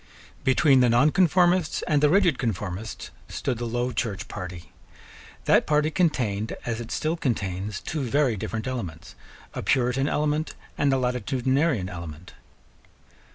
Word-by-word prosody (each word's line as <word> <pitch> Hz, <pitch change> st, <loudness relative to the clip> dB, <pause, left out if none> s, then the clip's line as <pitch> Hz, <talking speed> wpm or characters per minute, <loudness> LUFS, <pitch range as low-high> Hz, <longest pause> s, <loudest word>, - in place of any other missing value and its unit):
Between 135 Hz, +1 st, +4 dB
the 125 Hz, -1 st, +4 dB
nonconformists 175 Hz, +6 st, +3 dB
and 150 Hz, -2 st, +2 dB
the 150 Hz, -, +5 dB
rigid 180 Hz, -5 st, +3 dB
conformists 105 Hz, -2 st, -4 dB, 0.2 s
stood 125 Hz, -4 st, -3 dB
the 120 Hz, -, -3 dB
Low 120 Hz, +2 st, -1 dB
Church 105 Hz, -6 st, -3 dB
party. 90 Hz, -3 st, -8 dB, 0.7 s
That -, -, +4 dB
party 150 Hz, +1 st, +2 dB
contained, 115 Hz, -, 0 dB
as 115 Hz, -1 st, -2 dB
it 115 Hz, -, -8 dB
still 155 Hz, +6 st, -1 dB
contains, 100 Hz, -, -2 dB
two 155 Hz, -, -4 dB
very 135 Hz, -1 st, +1 dB
different 110 Hz, +3 st, -4 dB
elements, 90 Hz, -11 st, -5 dB, 0.4 s
a -, -, -4 dB
Puritan 130 Hz, +1 st, +1 dB
element 150 Hz, +1 st, -1 dB, 0.2 s
and 140 Hz, -1 st, +2 dB
a 135 Hz, -, +3 dB
Latitudinarian 130 Hz, -, 0 dB
element. 85 Hz, -1 st, -8 dB
125 Hz, 135 wpm, -25 LUFS, 105-150 Hz, 0.7 s, the